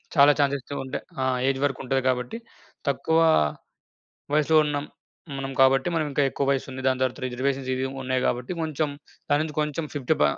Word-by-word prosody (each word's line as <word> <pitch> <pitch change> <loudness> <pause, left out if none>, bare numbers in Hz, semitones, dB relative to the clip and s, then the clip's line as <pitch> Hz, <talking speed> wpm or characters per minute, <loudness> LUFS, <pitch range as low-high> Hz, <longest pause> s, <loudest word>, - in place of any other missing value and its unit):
చాలా 145 -1 +8
ఛాన్సెస్ 140 -1 +2
అయితే 145 - -7
ఉంటాయి. 130 - -5 0.2
ఆ! - - +1 0.2
ఏజ్ 135 -1 +1
వరకు 140 -2 0
ఉంటది 135 +1 +1
కాబట్టి 125 - -1 0.5
తక్కువ 160 +4 +1 1.2
వయస్సులో 155 +1 +4
ఉన్నాం. 145 0 -2 0.4
హ్మ్. 140 - -6
మనం 135 0 -4
కాబట్టి 135 +1 +5
మనం 155 - +1
ఇంకా 140 +1 +2
ఎక్కువ 140 - -2
వయసు 135 -1 -1
ఉంది 130 0 -6
దాని 130 0 +1
తర్వాత 130 +1 0
రిజర్వేషన్స్ 130 +1 -2
ఇవి 130 +1 -1 0.2
ఉన్నాయి 130 0 0
కాబట్టి 125 +4 -2
కొంచెం 155 -1 -1 0.4
దానుంచి 150 +1 +1
కొంచెం 150 +1 -2
ఫిఫ్టీ 135 -4 +1
ప - - +7
135 Hz, 180 wpm, -25 LUFS, 130-145 Hz, 1.2 s, చాలా